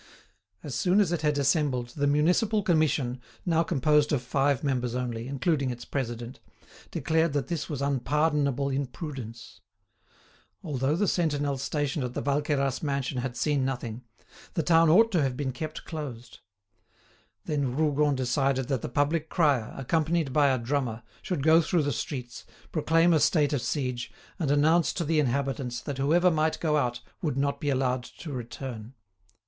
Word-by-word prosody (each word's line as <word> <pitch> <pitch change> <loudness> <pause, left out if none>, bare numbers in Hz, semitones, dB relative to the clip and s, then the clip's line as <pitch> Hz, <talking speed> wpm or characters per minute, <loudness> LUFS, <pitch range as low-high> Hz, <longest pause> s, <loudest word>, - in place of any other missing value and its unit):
As - - -6
soon 185 +1 +2
as 195 -5 +3
it 170 -3 -1
had 150 -1 +1
assembled, 135 -3 +1
the 145 +3 -1
Municipal 180 +9 +2
Commission, 150 -8 +1 0.2
now 165 -2 +3
composed 150 -2 +2
of 135 -5 0
five 135 +2 +1
members 125 -4 -1
only, 120 -2 -3
including 140 0 0
its 120 -1 -6
president, 120 -2 -4 0.5
declared 160 -1 +1
that 145 -2 -1
this 165 -4 -3
was 140 -3 -3
unpardonable 140 0 +1
imprudence. 125 - -6 1.0
Although 145 -3 0
the 205 +4 +1
sentinel 145 -6 0
stationed 145 +1 -1
at 125 0 -4
the - - -2
Valqueyras 140 -2 0
mansion 140 -3 -2
had 125 0 -4
seen 145 -3 +1
nothing, 125 -3 -3 0.5
the 165 - +1
town 165 -1 +5
ought 225 +8 +6
to 175 -6 +2
have 130 -3 -1
been 135 -1 -2
kept 155 +5 -6
closed. 135 -7 -7 1.1
Then 140 -5 -1
Rougon 150 -2 +2
decided 130 0 0
that 135 -5 0
the - - -4
public 150 +5 0
crier, 145 -10 +2
accompanied 155 +1 0
by 145 -1 +4
a 130 -1 +2
drummer, 120 -2 -2 0.2
should 175 -7 -3
go 160 +2 +6
through 165 0 +1
the 145 -1 0
streets, 125 -2 -5 0.3
proclaim 165 +2 +3
a 160 - +4
state 150 -1 +3
of 140 - 0
siege, 125 -4 -2 0.3
and 155 -5 0
announce 155 +4 +3
to 170 - -2
the 160 +1 +2
inhabitants 135 -2 -1
that 135 +2 -6
whoever 170 +6 +4
might 155 0 +1
go 155 -2 +1
out 120 -4 -1 0.2
would 150 -5 -1
not 140 +2 0
be 145 - 0
allowed 130 -2 +1
to 150 +5 -10
return. 120 -1 -7
140 Hz, 165 wpm, -27 LUFS, 130-155 Hz, 1.1 s, ought